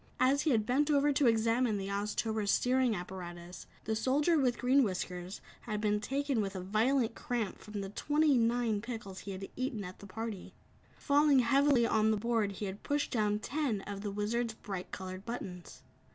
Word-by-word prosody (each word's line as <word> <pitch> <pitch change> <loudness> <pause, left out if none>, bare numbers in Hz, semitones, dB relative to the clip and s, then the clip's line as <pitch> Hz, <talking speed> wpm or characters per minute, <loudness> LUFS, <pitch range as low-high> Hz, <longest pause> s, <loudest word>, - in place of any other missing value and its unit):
As 270 +2 +4
he 320 - +1
had 220 -6 +2
bent 280 +6 +2
over 290 0 +3
to 275 -1 +3
examine 225 0 +2
the 195 0 -4
Oztober's 210 +1 -1
steering 250 0 +2
apparatus, 175 -1 -8 0.2
the 220 - -1
Soldier 280 +9 +2
with 250 -3 +2
Green 260 +3 +4
Whiskers 185 -3 -3 0.3
had 210 -2 -2
been 210 -1 +1
taken 275 +1 -1
with 195 -1 -3
a - - -3
violent 225 +6 +1
cramp 230 -6 -3
from 210 -1 -6
the 195 - -5
twenty 295 +6 +2
nine 230 -2 +1
pickles 220 -5 -6
he 200 - -7
had 190 +1 -6
eaten 255 -5 -3
at 185 0 -9
the 200 - -11
party. 220 -1 -6 0.4
Falling 290 0 +4
heavily 270 0 +4
on 220 -1 +3
the 215 - +2
board 220 -2 0
he 205 - -5
had 195 +1 -6
pushed 290 0 -1
down 210 -4 +1
ten 250 -2 -2
of 200 0 -6
the 205 - -3
Wizard's 220 +3 -1
bright 195 -4 -6
colored 185 0 -6
buttons. 190 -6 -7
220 Hz, 185 wpm, -32 LUFS, 200-255 Hz, 0.4 s, As